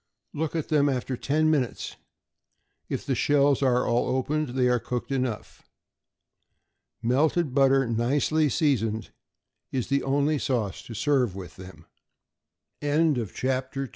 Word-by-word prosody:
Look 160 +1 -3
at 160 - -2
them 145 -2 +3
after 130 -1 -2
ten 155 +5 +1
minutes. 135 -6 -1 0.9
If - - -3
the - - 0
shells 145 -1 +3
are 125 -2 +2
all 120 0 +1
opened, 145 +3 -1
they 125 -1 +3
are 125 -1 +2
cooked 120 +4 -4
enough. 130 -5 -3 1.4
Melted 145 +4 +1
butter, 135 0 +4
nicely 140 +7 +1
seasoned, 115 -7 0 0.6
is 130 -3 -2
the 140 0 +2
only 145 +2 +1
sauce 110 -8 -2
to 115 - -8
serve 130 -5 +1
with 95 -2 -9
them. 95 0 -12 1.0
CLAMS. 145 - +1 0.4
=Li 135 -1 -3
135 Hz, 130 wpm, -26 LUFS, 120-145 Hz, 1.4 s, butter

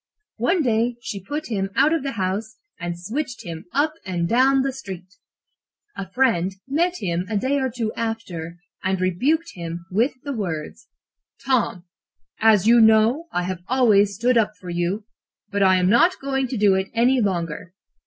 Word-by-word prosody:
One 310 - +1
day 235 0 +1
she 240 -7 -6
put 295 +8 -5
him 195 -2 -1
out 310 - +4
of 330 - 0
the 275 0 -3
house 205 +3 -3 0.2
and 175 0 -4
switched 245 +7 -4
him 165 -2 -7
up 295 +4 +1
and 175 -4 -2
down 260 +5 +4
the 270 - 0
street. 190 -9 -8 0.9
A 190 -2 -6
friend 195 -6 +1
met 340 +6 +1
him 175 - -2
a 215 - 0
day 270 +7 +1
or 265 -1 0
two 230 -2 -3
after, 185 -8 -4 0.3
and 190 0 0
rebuked 250 - 0
him 170 -1 -6
with 230 +8 +2
the 285 0 -4
words: 190 - -5 0.6
"'Tom, 240 -9 +1 0.6
as 215 -3 +4
you 235 +1 +6
know, 220 +8 +4
I 180 - -1
have 180 -1 -4
always 210 -6 +3
stood 240 +3 +3
up 215 -1 0
for 180 -2 -7
you, 175 +5 -2 0.5
but 200 0 -1
I 190 -1 +5
am 180 -1 +2
not 240 - +4
going 270 -1 -1
to 250 - -4
do 205 -1 +4
so 190 - -10
any 245 +2 +3
longer. 180 -2 -3
220 Hz, 175 wpm, -22 LUFS, 185-260 Hz, 0.9 s, you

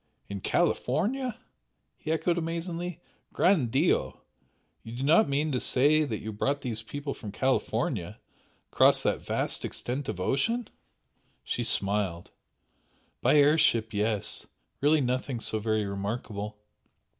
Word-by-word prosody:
"In 100 -1 -5
California!" 225 - 0 0.6
he 160 - -5
echoed 170 +2 +1
amazedly 170 +1 -4 0.3
"Gran' 175 -8 +3
Dio! 135 +9 +1 0.6
You 115 - -9
do 130 - -4
not 155 +4 +5
mean 150 +2 0
to 130 - 0
say 150 +6 +4
that 110 -6 -3
you 110 0 -5
brought 140 +7 -1
these 115 -5 -3
people 140 +5 -5
from 105 - -8
California, 130 +5 -1 0.5
across - - +5
that - - 0
vast - - -2
extent 130 +3 -3
of 90 - -4
ocean?" 225 - 0 0.8
She 120 - -2
smiled. 100 -5 0 0.9
"By - - +4
air 150 +2 +5
ship 110 -5 +2
yes! 105 0 -1 0.3
Really 150 +2 +4
nothing 130 0 -1
so 110 -1 -1
very 110 -1 0
remarkable! 105 +1 -4
130 Hz, 130 wpm, -28 LUFS, 110-155 Hz, 0.9 s, not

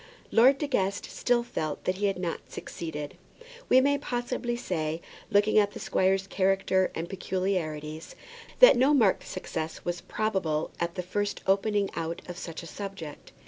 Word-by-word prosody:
Lord 260 +4 +6
De 295 - -1
Guest 200 -8 0
still 240 -1 +1
felt 155 -10 -4
that 185 0 0
he 205 +1 +1
had 195 - -1
not 175 -2 -4
succeeded. 150 -3 -6 0.5
We 255 - +7
may 285 +1 +2
probably 245 -2 -2
say, 165 -9 -2 0.3
looking 205 +1 +4
at 205 -1 +2
the - - -7
squire's 190 +1 +1
character 190 -1 +2
and 165 +1 -3
peculiarities, 165 -5 -3 0.5
that - - +10
no 265 +4 +4
marked 220 -8 +3
success 160 -3 -5
was 175 0 -2
probable 185 -9 -1
at 170 0 -2
the 180 - -3
first 205 +3 -2
opening 200 +1 +2
out 165 0 -3
of 180 0 -7
such 165 0 -6
a - - -8
subject. 180 -4 -8
190 Hz, 160 wpm, -28 LUFS, 170-215 Hz, 0.5 s, that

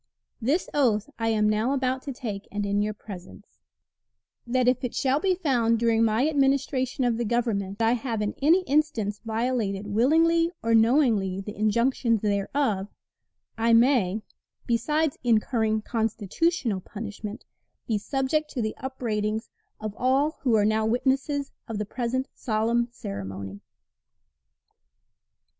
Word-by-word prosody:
This 285 +10 +1
oath 245 -3 +1
I 225 - 0
am 215 -1 +2
now 215 +5 +1
about 260 -1 0
to 280 - -5
take, 215 -6 -6
and 205 0 -2
in 200 0 +1
your 210 0 -1
presence: 200 0 -11 0.9
That 250 +1 +1
if 255 0 +2
it 250 - -3
shall 270 +1 +2
be 370 +2 +2
found 245 -10 +2
during 230 0 +2
my 225 +5 +2
administration 270 -3 +1
of 240 -2 +1
the 240 - -1
Government 215 -4 -1
I 225 - +4
have 235 -2 -1
in 210 - -2
any 335 +6 +4
instance 280 - 0
violated 225 -3 -1
willingly 325 +10 +3
or 230 0 +2
knowingly 225 -5 +3
the 210 +2 -7
injunctions 230 +1 +1
thereof, 205 0 0 0.7
I 230 +1 +3
may 230 -4 +3 0.4
(besides 300 +6 0
incurring 220 -2 +1
constitutional 225 - -1
punishment) 210 +1 -7 0.4
be 220 -3 0
subject 275 +6 -1
to 250 - -2
the 215 - -2
upbraidings 220 -5 -3 0.3
of 215 -1 -4
all 275 +6 +1
who 245 -4 +2
are 210 -1 +3
now 215 +1 +2
witnesses 270 +5 0 0.2
of 225 - -4
the 210 - -2
present 250 +4 -2
solemn 230 +1 0
ceremony. 100 - -7
230 Hz, 135 wpm, -26 LUFS, 210-265 Hz, 0.9 s, I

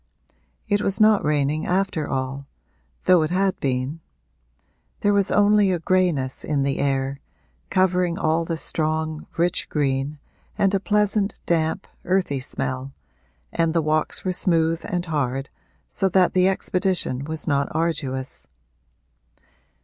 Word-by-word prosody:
It 205 -1 +1
was 195 0 0
not 215 -1 +5
raining 150 +1 0
after 185 -4 0
all, 135 +1 -3 0.6
though 180 -2 +6
it 155 - 0
had 190 +2 0
been; 130 +3 -2 1.0
there 205 0 +3
was 200 -1 +2
only 205 -1 +4
a 180 - +1
grayness 165 -7 0
in 145 -2 0
the 135 0 -1
air, 135 0 -1 0.5
covering 180 -2 +2
all 160 +1 +1
the 165 0 -3
strong, 155 -1 -2
rich 175 +1 0
green, 140 0 -1 0.4
and 195 0 +2
a 195 - +2
pleasant 210 0 +1
damp, 160 -2 0 0.2
earthy 180 -7 0
smell, 130 +1 -4 0.6
and 165 0 0
the 165 - +3
walks 155 +4 +2
were 185 - 0
smooth 165 -2 +1
and 175 0 -2
hard, 135 -4 -2 0.4
so 195 - 0
that 185 0 +3
the 185 0 +4
expedition 185 -8 0
was 160 +1 -5
not 140 -2 +1
arduous. 145 -5 -2
165 Hz, 135 wpm, -23 LUFS, 140-185 Hz, 1.0 s, though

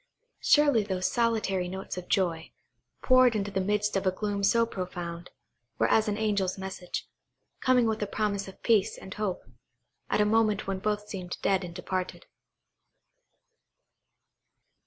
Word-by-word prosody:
Surely 290 -6 +4
those 190 -2 -2
solitary 220 -6 +1
notes 190 +2 -5
of 180 -1 -7
joy, 170 -4 0 0.5
poured 255 -2 +5
into 205 -1 -2
the 190 -1 0
midst 210 +2 0
of 195 0 0
a - - +4
gloom 200 +1 -3
so 230 +4 +4
profound, 175 -4 -6 0.5
were 115 - +3
as 220 0 +3
an 205 -1 -1
angel's 200 -4 0
message, 190 -1 -5 0.5
coming 255 -2 +3
with 220 -1 -1
a 205 - -1
promise 200 -1 -1
of 190 - -13
peace 215 -4 +2
and 190 - -9
hope, 205 -4 -3 0.7
at - - +1
a 210 - +4
moment 215 -1 +2
when 195 -1 -2
both 210 +1 -2
seemed 180 -4 -6
dead 195 -1 +2
and 175 -1 -8
departed. 185 0 -4
200 Hz, 150 wpm, -28 LUFS, 185-215 Hz, 0.7 s, poured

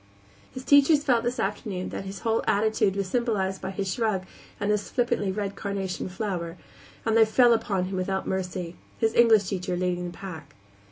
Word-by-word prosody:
His 260 - -8
teachers 285 +2 +5
felt 240 -5 +2
this 245 +1 -2
afternoon 195 -2 -3
that - - -5
his 195 +1 -7
whole 225 -1 +1
attitude 205 -2 +2
was 200 -1 -1
symbolized 195 -4 -1
by 190 - -4
his 190 -1 -2
shrug 215 -5 -1 0.3
and 205 0 0
his 210 -1 -1
flippantly 240 -6 0
red 200 0 -3
carnation 195 -2 -3
flower, 180 -3 -4 0.5
and 225 -1 +2
they 225 - +7
fell 235 +2 +5
upon 205 -5 0
him 190 0 -4
without 190 +1 -1
mercy, 180 -2 -3 0.2
his 225 -1 +1
English 225 -3 +6
teacher 185 -1 -2
leading 180 -1 -1
the 175 - -12
pack. 160 -7 -9
200 Hz, 180 wpm, -26 LUFS, 185-225 Hz, 0.5 s, they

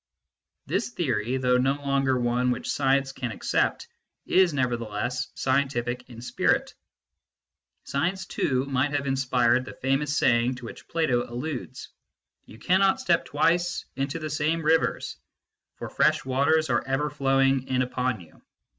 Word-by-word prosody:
This - - -1
theory, 130 - -1
though 125 -1 +2
no 135 +2 +2
longer 140 -2 0
one 120 +1 +1
which 125 0 -2
science 135 -1 +1
can 125 -3 -5
accept, - - -1 0.4
is 185 -2 +4
nevertheless 120 -2 -2
scientific 130 -2 -1
in 115 -1 -10
spirit. - - 0 1.1
Science, 180 +7 -1
too, 130 -7 -1
might 140 +1 0
have 145 -1 -1
inspired 130 -2 +2
the - - -9
famous 135 +2 0
saying 120 +1 +3
to 125 -1 -10
which - - -10
Plato 130 -8 0
alludes: 130 +2 -5 0.3
" - - -52
You 110 - -13
cannot 190 +7 +3
step 170 -1 +1
twice 170 +4 +1
into 135 +3 -2
the 155 -2 -5
same 155 +2 0
rivers; 160 +2 +1 0.6
for - - -7
fresh - - +2
waters 140 +3 +2
are 120 - +1
ever 135 +2 0
flowing 135 -2 +2
in 130 -1 +1
upon 125 -3 -2
you." 80 -3 -18
135 Hz, 145 wpm, -26 LUFS, 125-145 Hz, 1.1 s, is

